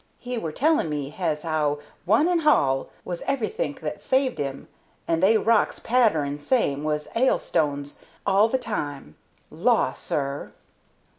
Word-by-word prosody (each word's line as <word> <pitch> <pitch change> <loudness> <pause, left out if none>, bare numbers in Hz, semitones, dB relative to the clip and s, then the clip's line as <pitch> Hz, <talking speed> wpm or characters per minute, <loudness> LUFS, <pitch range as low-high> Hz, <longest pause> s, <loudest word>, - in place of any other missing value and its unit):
He 250 0 -5
were 165 -9 -3
telling 305 - +2
me 145 -2 -3
has'ow 155 -3 -1 0.3
'One 220 - +4
and 350 -2 +2
hall' 135 - +3 0.2
was 175 -1 -4
everythink 275 - -2
that - - -5
saved 260 0 +1
'im, 140 -1 -4 0.4
and 165 0 +1
they 210 +4 +5
rocks 225 0 +2
pattering 160 - +1
same 145 - +1
has 150 -1 -1
'ailstones 145 - 0 0.3
hall 200 +3 +4
the 260 - +1
time. 145 - -5 0.4
Law, - - +2
sir!" 140 0 -3
170 Hz, 135 wpm, -25 LUFS, -, 0.4 s, they